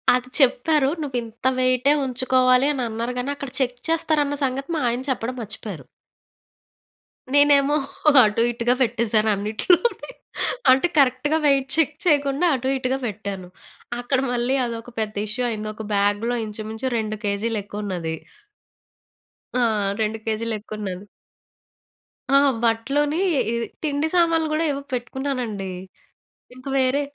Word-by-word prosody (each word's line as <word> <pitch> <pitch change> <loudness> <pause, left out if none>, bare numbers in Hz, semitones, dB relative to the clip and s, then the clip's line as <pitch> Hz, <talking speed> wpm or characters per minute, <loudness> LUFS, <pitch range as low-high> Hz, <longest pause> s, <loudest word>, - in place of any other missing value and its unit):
అది 250 0 -3
చెప్పారు. 275 +2 +3
నువ్వింత 240 -5 -5
వెయిటే 255 +2 +3
ఉంచుకోవాలి 255 +1 +3
అని 260 - -2
అన్నారు 230 +3 -3
గానీ, 250 +3 -3
అక్కడ 280 -2 -6
చెక్ 250 -1 0
చేస్తారన్న 305 -3 +1
సంగతి 270 +3 -3
మా 310 - -1
ఆయన 240 +2 -2
చెప్పడం 250 0 -3
మర్చిపోయారు. 200 -3 -7 1.5
నేనేమో 285 0 +5 0.5
అటూ 210 +2 0
ఇటుగా 240 +1 +1
పెట్టేశాను 225 -2 +1
అన్నిటిలోని. 220 - +1 0.6
అంటే, 265 +7 +4
కరక్ట్‌గా 280 +3 +3
వెయిట్ 275 -2 +3
చెక్ 315 -2 +2
చెయ్యకుండా 290 -2 +2
అటూ 260 +1 -3
ఇటుగా 260 0 -1
పెట్టాను. 200 -3 -5 0.5
అక్కడ 255 +2 0
మళ్ళీ 245 +2 +1
అదొక 230 0 -6
పెద్ద 215 -1 -2
ఇష్యూ 245 +4 -3
అయింది. 215 -1 -4
ఒక 220 - -8
బ్యాగ్‌‌లో 205 +4 +1
ఇంచుమించు 220 +3 -5
2 215 -1 -2
కేజీ‌లెక్కువున్నది. 200 -5 -3 1.4
ఆ! 240 -2 +3 0.3
2 220 +1 0
కేజీలెక్కువున్నాను. 215 -3 -4 1.3
ఆ! - - +8 0.3
బట్టలోనీ, 275 +7 +1 0.3
ఇది 235 0 -2 0.2
తిండి 295 0 0
సామాన్లు 330 -2 +3
గూడా 310 +2 +1
ఏవో 280 0 -4
పెట్టుకున్నానండి. 245 -5 -3 0.9
ఇంక 255 - -15
వేరే 260 +2 +2
245 Hz, 115 wpm, -22 LUFS, 220-275 Hz, 1.5 s, ఆ